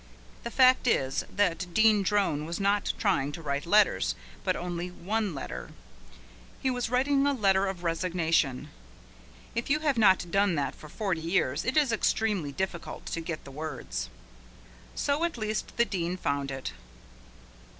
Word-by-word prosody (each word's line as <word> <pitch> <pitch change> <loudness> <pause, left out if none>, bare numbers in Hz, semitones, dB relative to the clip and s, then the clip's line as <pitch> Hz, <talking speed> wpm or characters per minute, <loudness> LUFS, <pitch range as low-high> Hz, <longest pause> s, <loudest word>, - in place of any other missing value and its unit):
The 235 - -3
fact 255 +1 +5
is 135 - +1
that 180 -3 0
Dean 220 -2 +5
Drone 190 -7 +1
was 170 +3 -4
not 200 +1 +2
trying 165 -10 +1
to 165 - -7
write 140 +2 -2
letters, 210 +3 +3 0.3
but 185 -1 +1
only 175 0 -3
one 200 +1 -2
letter. 60 - -6 0.9
He 260 - 0
was 245 -2 -2
writing 275 +3 +2
a 285 - +2
letter 195 -5 +3
of 190 -2 -5
resignation. 165 -5 0 0.8
If 235 - -3
you 305 +2 +2
have 285 -6 +1
not 190 -5 +4
done 195 -2 +3
that 145 -2 -1
for 155 - -13
forty 190 -2 -2
years 165 -4 0
it 260 +5 0
is 290 -5 +4
extremely 210 -8 0
difficult 175 +2 -4
to 165 - -2
get 165 -1 -5
the 140 - -11
words. 150 -2 -5 0.9
So 285 +3 0
at 340 -6 -1
least 215 -1 -3
the 235 - +4
Dean 180 -4 -2
found 140 -4 -1
it. 135 -1 -5
190 Hz, 160 wpm, -28 LUFS, 165-225 Hz, 0.9 s, fact